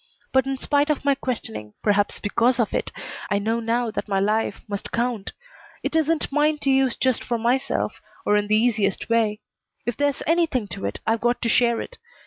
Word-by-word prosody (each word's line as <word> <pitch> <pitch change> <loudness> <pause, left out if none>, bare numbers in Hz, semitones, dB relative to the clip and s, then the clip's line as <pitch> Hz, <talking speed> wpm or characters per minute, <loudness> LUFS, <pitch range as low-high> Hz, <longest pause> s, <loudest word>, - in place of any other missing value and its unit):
But 265 0 +3
in 270 0 -1
spite 290 +2 +2
of 300 -2 0
my 280 - +5
questioning, 110 - -5
perhaps 205 -1 +2
because 240 +5 +2
of 230 - +1
it, - - -1 0.4
I 200 - +2
know 220 +3 0
now 230 0 0
that 215 - -4
my 195 -2 +1
life 215 +3 0
must 200 -1 -5
count. 235 -4 -1 0.5
It - - -2
isn't 320 -1 +1
mine 300 +1 +2
to 275 - +3
use 265 -2 +3
just 260 -3 +1
for 240 - -1
myself, 245 +4 0 0.2
or 210 - +3
in 205 0 +1
the 215 +1 +4
easiest 215 -4 +1
way. 220 -2 +2 0.4
If 240 -1 -1
there's 285 -1 0
anything 320 -9 +1
to 100 - -5
it, 100 - -4
I've 225 0 +1
got 240 +1 +1
to 230 - +1
share 235 0 +3
it. - - -9
235 Hz, 200 wpm, -24 LUFS, 210-270 Hz, 0.5 s, my